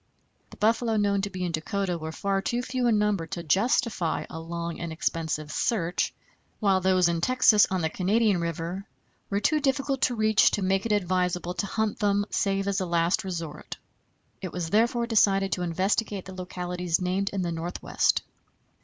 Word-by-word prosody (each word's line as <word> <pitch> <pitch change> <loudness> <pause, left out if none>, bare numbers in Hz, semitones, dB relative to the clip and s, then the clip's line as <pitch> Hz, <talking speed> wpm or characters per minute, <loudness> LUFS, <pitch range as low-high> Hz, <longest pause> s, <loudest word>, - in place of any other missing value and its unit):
The - - -14
buffalo 225 +1 +2
known 200 -1 +2
to 200 - -2
be 185 -1 -5
in 175 - -1
Dakota 180 +3 -2
were 160 -1 -5
far 195 +3 -1
too 240 +5 -1
few 255 -1 -1
in 225 -3 +3
number 210 -5 0
to 170 +2 -5
justify 195 0 +1
a 160 - -6
long 170 0 -5
and 170 -1 -4
expensive 160 -2 -2
search, 180 -3 0 0.5
while 195 -3 +2
those 185 -1 +3
in 170 -1 -1
Texas, 245 -2 +5
on 185 -1 -1
the 160 - +1
Canadian 200 0 +2
River, 170 +4 -4 0.4
were 200 - 0
too 305 +9 +2
difficult 275 -1 0
to 245 - +2
reach 215 -2 +4
to 205 - -2
make 195 +3 +1
it - - -3
advisable 180 -3 0
to 200 - -2
hunt 220 +1 -1
them 205 -1 +2
save 195 0 0
as 200 -1 0
a - - -1
last 170 +1 +1
resort. 165 -5 -6 0.6
It 185 - -5
was 170 -2 -4
therefore 235 +3 +2
decided 195 -4 +3
to 180 - -1
investigate 190 +3 -1
the 190 - -9
localities 180 -1 -2
named 190 +2 0
in 195 -2 -2
the 170 - -2
Northwest. 170 +2 0
190 Hz, 180 wpm, -27 LUFS, 170-210 Hz, 0.6 s, Texas